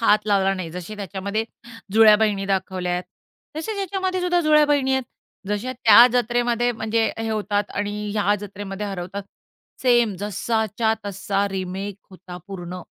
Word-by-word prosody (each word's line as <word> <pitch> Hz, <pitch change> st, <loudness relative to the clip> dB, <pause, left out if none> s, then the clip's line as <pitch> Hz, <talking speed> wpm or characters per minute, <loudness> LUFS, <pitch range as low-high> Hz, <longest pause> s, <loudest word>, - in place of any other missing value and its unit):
हात 215 Hz, -2 st, +3 dB
लावला 195 Hz, -2 st, +3 dB
नाही. 185 Hz, -3 st, -5 dB
जसे 180 Hz, +5 st, -7 dB
त्याच्यामध्ये 200 Hz, +2 st, -3 dB, 0.5 s
जुळ्या 215 Hz, 0 st, +7 dB
बहिणी 210 Hz, -2 st, +1 dB
दाखवल्या 185 Hz, -2 st, -1 dB
आहेत, 180 Hz, +1 st, -2 dB, 0.5 s
तसेच 410 Hz, +7 st, -4 dB
ह्याच्यामध्येसुद्धा 370 Hz, -2 st, 0 dB
जुळ्या 305 Hz, -2 st, +5 dB
बहिणी 280 Hz, -2 st, +2 dB
आहेत. 265 Hz, 0 st, +1 dB, 0.5 s
जशा 210 Hz, +5 st, -2 dB
त्या 235 Hz, -1 st, +7 dB
जत्रेमध्ये 240 Hz, 0 st, +1 dB
म्हणजे 220 Hz, 0 st, 0 dB
अ, 225 Hz, -, -7 dB
हे 225 Hz, -, -2 dB
होतात 205 Hz, -1 st, -1 dB
आणि 205 Hz, 0 st, -2 dB, 0.2 s
ह्या 205 Hz, -1 st, +2 dB
जत्रेमध्ये 200 Hz, 0 st, -6 dB
हरवतात. 195 Hz, 0 st, -5 dB, 0.6 s
सेम 240 Hz, -4 st, +3 dB
जसाच्या 220 Hz, +2 st, -1 dB
तसा 200 Hz, 0 st, -1 dB
रिमेक 190 Hz, +1 st, -4 dB
होता 185 Hz, -1 st, -10 dB
पूर्ण. 180 Hz, -2 st, -7 dB
210 Hz, 145 wpm, -22 LUFS, 195-235 Hz, 0.6 s, जुळ्या